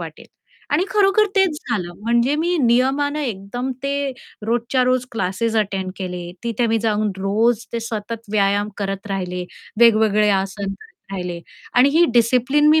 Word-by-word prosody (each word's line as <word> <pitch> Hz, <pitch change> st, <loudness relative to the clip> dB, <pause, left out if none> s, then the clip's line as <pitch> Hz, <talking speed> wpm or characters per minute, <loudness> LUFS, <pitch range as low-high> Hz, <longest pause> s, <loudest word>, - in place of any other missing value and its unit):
वाटेल" -, -, -9 dB, 0.5 s
आणि 325 Hz, +6 st, +3 dB
खरोखर 415 Hz, +1 st, +4 dB
तेच 375 Hz, -6 st, +3 dB
झालं. 180 Hz, -6 st, -2 dB
म्हणजे 235 Hz, +5 st, +2 dB
मी 345 Hz, +3 st, 0 dB
नियमाने 270 Hz, +5 st, +2 dB
एकदम 225 Hz, +6 st, -4 dB
ते 280 Hz, 0 st, -1 dB, 0.4 s
रोजच्या 240 Hz, +3 st, +1 dB
रोज 255 Hz, 0 st, +1 dB
क्लासेस 225 Hz, +2 st, -1 dB
अटेंड 195 Hz, -3 st, -1 dB
केले. 180 Hz, -2 st, -5 dB
तिथे 235 Hz, 0 st, 0 dB
मी 225 Hz, 0 st, +2 dB
जाऊन 215 Hz, -1 st, +1 dB
रोज 220 Hz, +4 st, +1 dB
ते 235 Hz, -, -2 dB
सतत 225 Hz, -1 st, -6 dB
व्यायाम 205 Hz, 0 st, +2 dB
करत 195 Hz, 0 st, -3 dB
राहिले, 180 Hz, -2 st, -3 dB, 0.4 s
वेगवेगळे 215 Hz, -2 st, +5 dB
आसन 195 Hz, +1 st, -1 dB
करत 195 Hz, 0 st, -18 dB
राहिले. 180 Hz, -3 st, -4 dB, 0.3 s
आणि 250 Hz, +3 st, +6 dB
ही 325 Hz, +4 st, +5 dB
डिसिप्लिन 250 Hz, +5 st, +3 dB
मी 315 Hz, -, +5 dB
230 Hz, 150 wpm, -20 LUFS, 195-255 Hz, 0.5 s, आणि